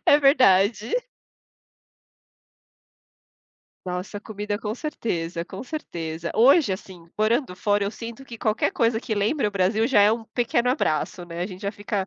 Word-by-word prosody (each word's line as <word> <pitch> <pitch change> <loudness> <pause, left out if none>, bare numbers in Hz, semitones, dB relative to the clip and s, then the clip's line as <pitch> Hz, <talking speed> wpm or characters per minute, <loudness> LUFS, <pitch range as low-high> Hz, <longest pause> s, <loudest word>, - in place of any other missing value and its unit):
É 290 - +7
verdade. 220 - +4 2.9
Nossa, 180 +3 -4
comida, 210 -1 -4
com 215 -1 -3
certeza, 175 - -3
com 190 +4 -8
certeza. 170 - -5
Hoje, 265 - +5
assim, 185 -3 -9
morando 220 0 +1
fora, 205 +1 +1
eu 200 - -1
sinto 230 +4 -8
que 235 -3 -9
qualquer 215 -1 0
coisa 230 -1 +2
que 225 -2 -3
lembra 210 +5 +1
o - - -1
Brasil 205 +3 +1
já 245 -6 +4
é 205 +1 +6
um 225 0 -1
pequeno 240 +1 0
abraço, 175 - 0
né, 170 0 -7
a 180 - -1
gente 185 -1 -10
já 200 - -1
fica 205 -2 -3
210 Hz, 155 wpm, -24 LUFS, 185-235 Hz, 2.9 s, É